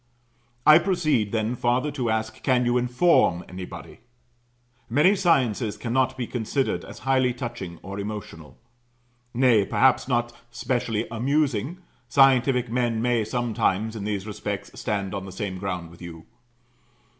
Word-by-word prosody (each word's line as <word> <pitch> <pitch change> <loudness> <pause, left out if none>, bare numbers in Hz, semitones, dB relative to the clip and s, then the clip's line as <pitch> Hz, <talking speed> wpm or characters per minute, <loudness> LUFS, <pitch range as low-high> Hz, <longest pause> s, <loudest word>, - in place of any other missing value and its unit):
I 155 +1 +9
proceed 155 - 0
then 110 +1 -1
farther 125 +5 0
to 130 -5 -2
ask, 110 0 -2
Can 125 -2 +2
you 120 0 +1
inform 125 - +3
anybody? 90 0 -9 0.9
Many 150 - +4
sciences 130 - +1
cannot 130 +2 0
be 125 - -2
considered 125 +4 -2
as - - -11
highly 130 -2 +2
touching 115 -9 -6
or 100 +2 -6
emotional; 100 -8 -7 0.8
nay, 120 -4 +4
perhaps 130 +7 +2
not 120 -2 0 0.2
specially 120 -3 -2
amusing; 140 - -1 0.3
scientific 130 -2 +4
men 120 -2 0
may 120 -1 +1
sometimes, 110 -2 -1
in 105 - -5
these 100 -2 -3
respects, 105 -2 -5
stand 100 -4 -3
on 95 -1 -4
the - - -8
same 95 -1 -5
ground 90 -4 -4
with 85 - -16
you. 85 -2 -9
120 Hz, 135 wpm, -25 LUFS, 100-130 Hz, 0.9 s, I